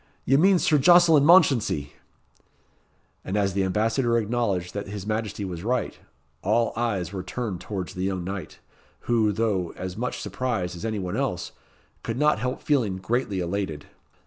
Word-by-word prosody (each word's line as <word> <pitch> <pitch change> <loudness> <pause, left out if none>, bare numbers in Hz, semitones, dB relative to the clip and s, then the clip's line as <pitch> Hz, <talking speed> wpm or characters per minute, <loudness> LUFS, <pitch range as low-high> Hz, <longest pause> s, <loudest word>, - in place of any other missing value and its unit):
Ye 135 - +3
mean 185 +6 +5
Sir 155 -3 +3
Jocelyn 175 -1 +6
Mounchensey." 125 - +4 1.3
And 95 - -2
as 100 -2 +1
the 100 0 +1
Ambassador 115 +5 +1
acknowledged 105 -6 -1
that 100 0 -4
his 100 -1 -6
Majesty 105 -1 -3
was 90 -2 -6
right, 125 +3 -1 0.4
all 115 +4 +1
eyes 100 -7 -2
were 95 - -3
turned 95 -1 -4
towards 95 -4 -5
the 90 - -5
young 95 -2 -2
knight, 95 +1 -6 0.4
who, 115 -3 +2
though 100 -5 -1
as 90 -1 -5
much 125 +3 -3
surprised 100 -4 -3
as 85 - -7
any 110 -1 -2
one 90 0 -3
else, 125 -11 -2 0.5
could 115 +1 -4
not 150 -3 +3
help 125 +3 -3
feeling 120 -11 +1
greatly 100 0 -1
elated. 85 -4 -3
105 Hz, 160 wpm, -25 LUFS, 95-120 Hz, 1.3 s, Jocelyn